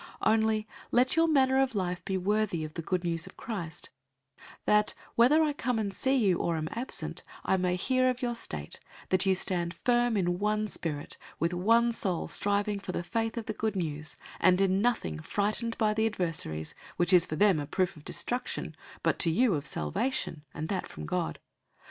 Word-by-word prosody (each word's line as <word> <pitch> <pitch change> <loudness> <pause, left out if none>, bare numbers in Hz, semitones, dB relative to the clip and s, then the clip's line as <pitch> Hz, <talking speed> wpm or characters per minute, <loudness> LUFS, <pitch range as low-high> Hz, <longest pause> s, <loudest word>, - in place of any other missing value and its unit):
001:027 - - +5
Only 220 -1 +1 0.2
let 255 +3 +3
your 330 0 +4
manner 265 -3 +4
of 265 -3 0
life 180 -2 -2
be 190 - -1
worthy 200 -3 0
of 155 - -9
the 165 - -4
Good 180 +2 -1
News 165 -1 -1
of - - -13
Christ, 175 -9 -5 0.7
that, 210 0 +3 0.2
whether 280 +7 +5
I 300 -2 +1
come 250 -4 -1
and 205 -3 -2
see 265 +6 +1
you 200 -9 +3
or 170 -1 0
am 155 0 -3
absent, 240 +3 -3 0.2
I - - +3
may 180 -1 +1
hear 255 +7 +2
of 250 -1 -2
your 240 -1 0
state, 230 - -4 0.3
that 185 +1 +3
you 190 - +5
stand 175 -2 +1
firm 240 -2 +2
in 175 -2 0
one 210 +1 0
spirit, 150 -7 -4 0.2
with 170 +3 0
one 230 +6 +3
soul 185 -7 0
striving 205 0 +1
for 190 -2 -6
the 175 - -2
faith 225 +4 -2
of 230 - -3
the 215 - -3
Good 215 -1 -2
News; 155 -4 -3
001:028 - - -30 0.2
and 185 +1 +4
in 195 0 +2
nothing 210 - 0
frightened 215 - -1
by 215 -1 +2
the 220 +1 +2
adversaries, 165 - -2 0.2
which 175 +1 +2
is 180 -2 +6
for 155 - -3
them 195 -1 +4
a 145 - -4
proof 185 +4 0
of 150 - -14
destruction, 245 +9 -2 0.3
but - - +1
to 170 - +7
you 225 +6 +3
of 145 -2 -1
salvation, 155 - -2
and 155 +3 -5
that 195 - -2
from 75 - -8
God. - - -2
200 Hz, 205 wpm, -29 LUFS, 175-230 Hz, 0.7 s, to